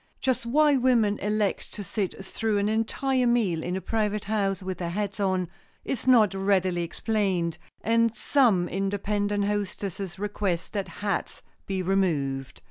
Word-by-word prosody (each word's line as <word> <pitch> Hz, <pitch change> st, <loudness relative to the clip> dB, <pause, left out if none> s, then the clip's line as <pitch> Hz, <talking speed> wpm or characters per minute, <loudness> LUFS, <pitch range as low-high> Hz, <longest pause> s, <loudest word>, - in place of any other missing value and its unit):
Just 255 Hz, -2 st, 0 dB
why 295 Hz, +3 st, +4 dB
women 235 Hz, -5 st, +3 dB
elect 210 Hz, 0 st, -1 dB
to 205 Hz, -, -5 dB
sit 195 Hz, -1 st, -3 dB
through 220 Hz, +1 st, -1 dB
an 200 Hz, 0 st, +1 dB
entire 245 Hz, +4 st, +1 dB
meal 215 Hz, -9 st, +2 dB
in 175 Hz, +2 st, -2 dB
a 190 Hz, -, -3 dB
private 210 Hz, -1 st, -1 dB
house 200 Hz, -3 st, -1 dB
with 185 Hz, -1 st, -4 dB
their 170 Hz, -2 st, -2 dB
hats 200 Hz, +2 st, -3 dB
on 185 Hz, -2 st, +1 dB, 0.4 s
is 260 Hz, -1 st, -3 dB
not 220 Hz, -6 st, +6 dB
readily 190 Hz, -2 st, +1 dB
explained 180 Hz, -1 st, -1 dB, 0.2 s
and 230 Hz, 0 st, +2 dB
some 215 Hz, -7 st, +3 dB
independent 205 Hz, +1 st, -1 dB
hostesses 200 Hz, -2 st, -3 dB
request 200 Hz, -3 st, -2 dB
that 200 Hz, -2 st, -2 dB
hats 205 Hz, -1 st, -3 dB, 0.2 s
be 190 Hz, -1 st, -1 dB
removed. 145 Hz, -8 st, 0 dB
205 Hz, 145 wpm, -26 LUFS, 185-220 Hz, 0.4 s, not